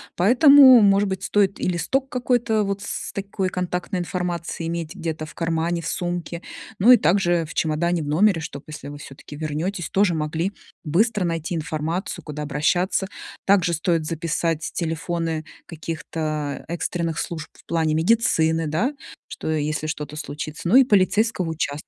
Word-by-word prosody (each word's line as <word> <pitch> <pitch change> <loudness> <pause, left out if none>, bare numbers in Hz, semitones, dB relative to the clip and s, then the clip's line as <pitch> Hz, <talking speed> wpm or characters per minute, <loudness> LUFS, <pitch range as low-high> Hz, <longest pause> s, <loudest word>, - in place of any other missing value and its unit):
Поэтому, 260 - +8
может 200 0 +4
быть, 190 0 -4
стоит 200 -1 +1
и - - -1
листок 255 +10 0
какой-то 240 -4 +1
вот 200 0 -3
с - - -4
такой 195 -1 -3
контактной 180 0 -3
информацией 175 -2 -3
иметь 165 -2 -4
где-то 160 -1 -4
в 155 - -12
кармане, 165 +1 -1
в 165 - -5
сумке. 175 -1 -3 0.4
Ну 235 +6 +8
и - - +8
также 175 -4 +2
в 160 - -9
чемодане 165 +2 0
в 150 - -5
номере, 175 +4 +3
чтоб, 145 -3 -7
если 150 -2 -8
вы 145 0 -8
всё-таки 140 +1 -11
вернетесь, 160 +4 -3
тоже 195 -2 +2
могли 160 +4 -2 0.3
быстро 195 +5 +2
найти 165 0 -2
информацию, 160 +4 -3
куда 150 -1 -6
обращаться. 175 +7 0 0.4
Также 185 -3 +3
стоит 165 0 0
записать 165 0 -2
телефоны 165 -1 -2 0.2
каких-то 155 -3 -4
экстренных 170 -1 -2
служб 165 -2 -5
в - - -21
плане 160 -2 0
медицины, 165 -4 +2
да, 205 - 0 0.3
что - - -6
если 155 0 -1
что-то 150 -1 -5
случится, 150 +1 -6
ну 195 - +3
и 265 - +9
полицейского 205 -4 +2
участка. 150 -2 -3
170 Hz, 155 wpm, -23 LUFS, 155-195 Hz, 0.4 s, и